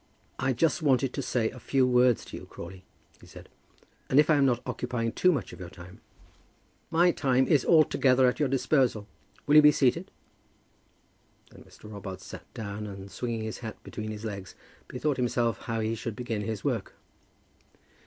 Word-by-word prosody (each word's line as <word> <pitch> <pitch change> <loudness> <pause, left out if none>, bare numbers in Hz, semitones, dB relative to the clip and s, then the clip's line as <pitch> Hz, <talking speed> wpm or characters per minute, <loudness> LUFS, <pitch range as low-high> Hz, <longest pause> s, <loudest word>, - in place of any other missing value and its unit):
"I 135 +1 +1
just 155 +5 +1
wanted 135 -3 +2
to 140 - -3
say 120 -4 0
a 125 - -11
few 135 +1 +2
words 125 -1 +3
to - - -9
you, - - -9
Crawley," 95 +2 -10 0.4
he - - -16
said, - - -13 0.6
"and 135 - +5
if 150 +1 +4
I - - +5
am 140 -1 +4
not 125 -2 0
occupying 120 -2 -2
too 180 +9 +3
much 140 -9 -3
of - - -11
your 90 -2 -7
time 90 +1 -13 0.4
" - - -38
"My 175 +1 +6
time 130 -4 +2
is 145 -6 +3
altogether 135 -5 +4
at 125 - 0
your 145 -3 +1
disposal. 130 -5 +1 0.4
Will 150 +1 +5
you - - +10
be 150 0 +7
seated?" 150 +6 +1 1.4
Then - - -15
Mr. - - -19
Robarts 95 -2 -8
sat - - -11
down, 105 -2 -5
and, 100 -1 -9
swinging 115 +3 -3
his 110 0 -5
hat 110 -2 -7
between 110 0 -6
his 110 +1 -6
legs, 100 -3 -6 0.3
bethought 140 +2 -2
himself 120 -4 0
how 115 -2 -3
he 110 +1 -1
should 115 -1 -5
begin 115 -3 -3
his 105 -1 -4
work. - - -2
125 Hz, 185 wpm, -28 LUFS, 110-135 Hz, 1.4 s, you